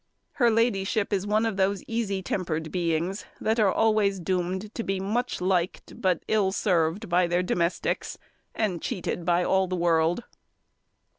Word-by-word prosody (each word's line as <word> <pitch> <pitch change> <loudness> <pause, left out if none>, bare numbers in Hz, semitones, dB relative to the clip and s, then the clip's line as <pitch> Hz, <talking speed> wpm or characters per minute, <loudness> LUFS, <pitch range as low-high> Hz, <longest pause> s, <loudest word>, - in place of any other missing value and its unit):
Her 240 -3 +3
ladyship 220 -3 +1
is 200 0 0
one 215 +2 +2
of 220 -4 -2
those 195 -1 +1
easy 210 -5 -2
tempered 160 -4 -2
beings 175 +2 -1 0.2
that 220 +2 0
are 205 -3 +4
always 215 -3 +2
doomed 185 +3 -2
to 230 - -3
be 195 -2 -1
much 230 +6 -1
liked, 180 -1 -1
but 185 -3 +1
ill 205 -3 +2
served, 180 +1 +1
by 175 0 +3
their 175 +1 +1
domestics, 175 -1 -1 0.4
and 190 -7 -1
cheated 180 -5 -3
by 175 +1 +3
all 190 +1 +2
the 185 - -2
world. 170 +3 +2
190 Hz, 155 wpm, -26 LUFS, 175-215 Hz, 0.4 s, are